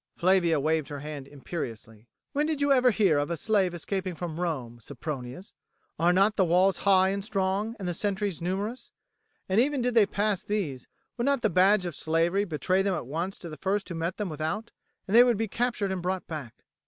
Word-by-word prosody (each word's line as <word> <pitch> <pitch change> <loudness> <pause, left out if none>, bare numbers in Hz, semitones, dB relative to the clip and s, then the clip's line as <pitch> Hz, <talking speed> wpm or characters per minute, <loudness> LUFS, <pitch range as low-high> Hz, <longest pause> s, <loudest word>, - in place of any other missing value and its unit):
Flavia 175 -3 +3
waved 155 0 0
her 145 -2 -6
hand 145 -2 -7
imperiously. 115 -7 -7 0.3
"When 295 +2 +1
did 315 -2 -1
you 285 0 +2
ever 255 -2 +5
hear 195 -10 +3
of 145 - -1
a 170 - -2
slave 200 -1 +2
escaping 185 +1 -3
from 165 -1 -5
Rome, 130 -9 -3
Sempronius? 135 - -7 0.5
Are 170 +2 +4
not 195 +4 +3
the 195 - +5
walls 180 +2 +3
high 190 -1 +4
and 200 0 -2
strong, 200 +2 -1
and 195 -4 -5
the 175 - -1
sentries 200 -2 -2
numerous? 200 +8 -3 0.6
And 195 +4 +3
even 285 +2 +1
did 245 0 0
they 220 -4 +5
pass 205 -2 0
these, 165 - -3 0.3
would 240 - -1
not 280 -3 +1
the 215 - +2
badge 190 +2 +4
of 170 -4 -4
slavery 170 +5 +1
betray 185 +2 0
them 195 -1 0
at 155 - -4
once 170 +8 -3
to 175 - -9
the 155 - -8
first 195 +1 -1
who - - -4
met 165 +1 -3
them 210 - -2
without, 160 +9 -3 0.4
and 200 - 0
they 240 - +10
would 240 -3 +2
be 225 +1 -1
captured 230 -3 -1
and 190 -2 -2
brought 185 +1 -2
back? 150 -8 -7
185 Hz, 210 wpm, -27 LUFS, 160-210 Hz, 0.6 s, they